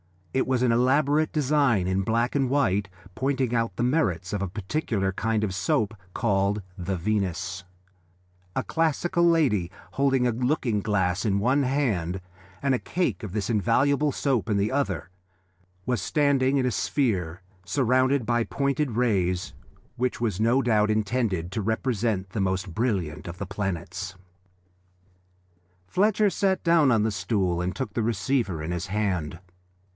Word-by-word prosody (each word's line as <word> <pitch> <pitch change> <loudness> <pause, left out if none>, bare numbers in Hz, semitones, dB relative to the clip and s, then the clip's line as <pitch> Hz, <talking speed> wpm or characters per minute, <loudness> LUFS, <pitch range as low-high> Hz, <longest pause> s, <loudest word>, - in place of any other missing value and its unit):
It 130 - +1
was 130 -1 +1
an 125 - +3
elaborate 140 +5 +3
design 140 - +2
in 95 +1 +1
black 115 +5 0
and 135 -3 +1
white, 105 -8 +1 0.3
pointing 130 -1 -1
out 115 -5 0
the 120 - -1
merits 105 - 0
of 105 - -1
a 100 - -1
particular 100 - -2
kind 110 +2 -1
of 100 -3 -1
soap 100 +3 0 0.2
called 100 -1 +1
the 95 +1 -2
Venus: 90 -1 -2 0.9
a - - 0
classical 170 +2 +1
lady, 140 - +3 0.2
holding 135 -2 +2
a 120 - +3
looking 125 -2 0
glass 95 -3 0
in 100 -2 +2
one 130 +7 +2
hand 110 - 0 0.4
and 140 -1 +2
a 125 - +1
cake 180 -6 -1
of 100 -4 -6
this 105 -1 -2
invaluable 135 +7 +2
soap 130 -5 0
in 105 - +2
the 100 +2 +1
other, 135 -8 -1 0.8
was 125 -5 0
standing 140 +1 +2
in 130 - +1
a 125 - +1
sphere 95 - -1 0.2
surrounded 130 +4 +2
by 120 0 +1
pointed 140 0 -1
rays, 95 -7 0 0.4
which 125 +1 -1
was 105 -5 -1
no 115 +5 +3
doubt 110 -3 +3
intended 105 -5 0
to 110 - -2
represent 110 -3 -1
the 100 +2 -3
most 95 -1 -1
brilliant 95 -10 -2
of 85 +1 -7
the 100 - -4
planets. 95 -1 -4 1.7
Fletcher 210 - +2
sat 190 0 0
down 165 -4 +4
on 115 -4 +3
the 110 - +1
stool 90 -2 0
and 90 0 -2
took 105 -1 -4
the 115 - 0
receiver 110 - 0
in 80 - -3
his 85 +1 -3
hand. 95 -6 -1
110 Hz, 155 wpm, -26 LUFS, 95-130 Hz, 1.7 s, down